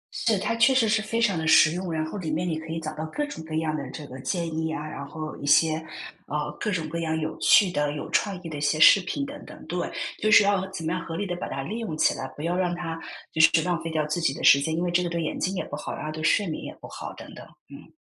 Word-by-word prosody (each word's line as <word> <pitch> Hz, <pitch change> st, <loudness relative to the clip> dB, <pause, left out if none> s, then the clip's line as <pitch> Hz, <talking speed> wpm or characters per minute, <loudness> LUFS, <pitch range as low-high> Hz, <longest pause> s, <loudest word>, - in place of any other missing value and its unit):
是， 225 Hz, -3 st, +1 dB
它 210 Hz, +4 st, -1 dB
确 240 Hz, +3 st, +4 dB
实 240 Hz, -4 st, +4 dB
是 215 Hz, 0 st, +2 dB
非 220 Hz, +2 st, -2 dB
常 205 Hz, -7 st, +2 dB
地 160 Hz, -, -2 dB
实 155 Hz, -1 st, +7 dB
用， 180 Hz, +1 st, -4 dB
然 155 Hz, -1 st, -1 dB
后 180 Hz, +6 st, -6 dB
里 165 Hz, -4 st, -4 dB
面 165 Hz, +4 st, -1 dB
你 160 Hz, -2 st, -1 dB
可 160 Hz, -, -10 dB
以 165 Hz, +1 st, -3 dB
找 155 Hz, -1 st, -5 dB
到 155 Hz, -, -5 dB
各 295 Hz, -, -2 dB
种 290 Hz, -, -8 dB
各 160 Hz, 0 st, -5 dB
样 155 Hz, -1 st, 0 dB
的 140 Hz, -4 st, -5 dB
这 150 Hz, +3 st, -8 dB
个 130 Hz, -1 st, -10 dB
建 170 Hz, +3 st, -2 dB
议 160 Hz, 0 st, -2 dB
啊， 155 Hz, -1 st, -4 dB
然 140 Hz, -2 st, -6 dB
后 155 Hz, +2 st, -6 dB
一 -, -, -7 dB
些， 155 Hz, +2 st, +5 dB, 0.5 s
呃， 150 Hz, 0 st, -3 dB
各 -, -, -1 dB
种 165 Hz, -5 st, -2 dB
各 165 Hz, +2 st, -4 dB
样 160 Hz, -1 st, -1 dB
有 155 Hz, 0 st, -3 dB
趣 200 Hz, -4 st, +5 dB
的、 145 Hz, -3 st, 0 dB
有 150 Hz, -, -5 dB
创 195 Hz, -3 st, 0 dB
意 -, -, -6 dB
的 160 Hz, -, -6 dB
一 -, -, -6 dB
些 150 Hz, +1 st, +1 dB
视 180 Hz, -, +9 dB
频 280 Hz, +10 st, -3 dB
等 285 Hz, +1 st, -9 dB
等。 -, -, -12 dB
对， -, -, -3 dB, 0.3 s
就 215 Hz, -, +2 dB
是 215 Hz, -, +8 dB
要 200 Hz, -2 st, +1 dB
怎 180 Hz, -4 st, -6 dB
么 160 Hz, -, 0 dB
样 180 Hz, -2 st, -3 dB
合 165 Hz, 0 st, -6 dB
理 205 Hz, -, -2 dB
地 180 Hz, -2 st, -3 dB
把 -, -, -4 dB
它 135 Hz, -, -4 dB
利 215 Hz, +11 st, -4 dB
用 200 Hz, -10 st, -4 dB
起 -, -, +3 dB
来， 130 Hz, -, -5 dB
不 145 Hz, -, -7 dB
要 170 Hz, +2 st, 0 dB
让 180 Hz, -1 st, 0 dB
它， 165 Hz, -2 st, -5 dB, 0.3 s
就 160 Hz, -, +3 dB
是 160 Hz, -, +8 dB
浪 175 Hz, -1 st, -1 dB
费 165 Hz, -, -3 dB
掉 155 Hz, -2 st, 0 dB
自 155 Hz, +3 st, -2 dB
己 135 Hz, -4 st, +1 dB
的 -, -, -7 dB
时 140 Hz, -, +8 dB
间。 160 Hz, +3 st, -1 dB
因 170 Hz, -, 0 dB
为 175 Hz, -, 0 dB
这 175 Hz, +1 st, +3 dB
个 175 Hz, -, -2 dB
对 170 Hz, 0 st, -2 dB
眼 160 Hz, -, -3 dB
睛 190 Hz, +2 st, -1 dB
也 -, -, -3 dB
不 -, -, -6 dB
好， 150 Hz, -, -5 dB
然 -, -, -6 dB
后 155 Hz, -, -3 dB
对 155 Hz, 0 st, -6 dB
睡 205 Hz, +6 st, +3 dB
眠 160 Hz, -4 st, -4 dB
也 -, -, -7 dB
不 -, -, -10 dB
好， -, -, -7 dB
等 -, -, -11 dB
等， -, -, -10 dB, 0.3 s
嗯。 -, -, -13 dB
165 Hz, 340 characters per minute, -26 LUFS, 155-185 Hz, 0.5 s, 视